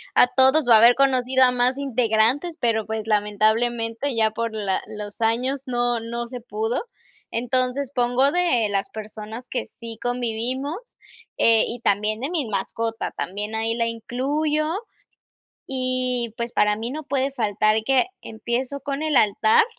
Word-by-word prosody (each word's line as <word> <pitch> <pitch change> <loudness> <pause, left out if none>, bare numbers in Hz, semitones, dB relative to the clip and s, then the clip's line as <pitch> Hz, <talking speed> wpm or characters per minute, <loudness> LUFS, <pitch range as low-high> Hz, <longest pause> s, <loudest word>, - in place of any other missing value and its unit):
a - - +7
todos 265 +2 +5
o 235 - +7
haber 230 +2 +7
conocido 260 -1 +3
a 250 - +5
más 250 +1 +1
integrantes, 255 +4 +1
pero, 225 -2 0
pues, 220 0 -3
lamentablemente, 225 +4 0
ya 220 -1 +2
por 230 0 -3
la 200 -3 -1
los 210 +1 -8
años 250 +4 +1
no 240 -1 0
no 235 +1 -5
se 250 0 -8
pudo. 220 0 -2 0.5
Entonces 255 +3 0
pongo 250 +3 +2
de 335 -11 +2
las 195 -1 -1
personas 220 +3 -8
que 255 - -3
sí 230 -1 -10
convivimos, 250 - -3 0.4
eh, 225 -1 +5
y 240 - -5
también 210 +1 +1
de 275 - -2
mi 320 -8 -2
mascota, 225 +3 -3
también, 210 +4 -4
ahí 225 +1 0
la 230 0 0
incluyo 285 +7 -1 1.0
y, 255 -3 -1
pues, 235 0 -4
para 210 0 +2
mí 225 +3 -4
no 310 +3 -5
puede 275 -1 0
faltar 215 -4 +1
que 270 +7 +3 0.2
empiezo 245 +5 -3
con 280 +1 -4
el 310 -2 0
altar 220 - +4
240 Hz, 150 wpm, -23 LUFS, 220-260 Hz, 1.0 s, a